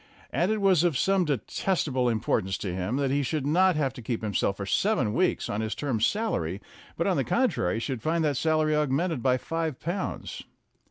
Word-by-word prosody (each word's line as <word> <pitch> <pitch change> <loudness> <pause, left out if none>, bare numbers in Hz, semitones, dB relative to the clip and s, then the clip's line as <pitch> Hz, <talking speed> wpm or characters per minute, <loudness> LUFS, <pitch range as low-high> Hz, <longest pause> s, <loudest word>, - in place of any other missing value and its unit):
And 180 +5 +1
it 215 -1 0
was 190 -4 +4
of 170 -6 +2
some 195 +2 +2
detestable 140 - 0
importance 105 -4 0
to 95 -3 -4
him 95 +6 -2
that 135 -1 0
he 140 +1 +2
should 140 +1 -2
not 180 +4 +3
have 140 -4 0
to 130 - -9
keep 115 0 -3
himself 100 -2 0
for 100 - -4
seven 125 - +1
weeks 185 +9 +1
on 105 - -2
his 110 0 -2
term's 125 -7 +1
salary, 100 - -1 0.4
but, - - 0
on - - +2
the - - +2
contrary, 90 +4 +1
should 120 0 -3
find 165 +4 0
that 150 -2 +1
salary 155 +2 +2
augmented 150 +1 0
by 130 0 +3
five 160 +1 -3
pounds. 175 +4 -4
140 Hz, 200 wpm, -27 LUFS, 115-165 Hz, 0.4 s, was